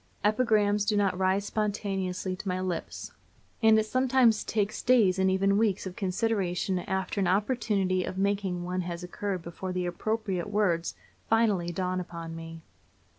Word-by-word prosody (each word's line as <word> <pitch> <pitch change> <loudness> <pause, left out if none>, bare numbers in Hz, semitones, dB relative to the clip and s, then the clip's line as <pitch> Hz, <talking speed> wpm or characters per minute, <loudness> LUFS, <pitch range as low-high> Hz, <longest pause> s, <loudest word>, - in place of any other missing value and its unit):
Epigrams 210 -2 +3
do 210 0 +1
not 200 -2 +2
rise 190 +2 +1
spontaneously 195 -3 -2
to 200 +2 -9
my 185 0 -1
lips, 185 -2 -4 0.5
and 220 -1 +6
it 220 - +2
sometimes 255 -2 +3
takes 210 -1 -1
days 215 -7 +4
and 190 0 +3
even 195 +2 +2
weeks 210 -4 +1
of 185 -1 -6
consideration 190 -2 -1
after 190 +2 -2
an 190 - +2
opportunity 200 -2 +1
of 185 - -5
making 195 -2 0
one 180 +1 -2
has 175 0 -5
occurred 185 0 -4
before 180 +2 -6
the 180 0 -2
appropriate 195 0 -2
words 185 -5 0 0.3
finally 210 -6 +2
dawn 185 +1 -1
upon 170 -2 -7
me. 165 0 -9
190 Hz, 155 wpm, -28 LUFS, 180-210 Hz, 0.5 s, and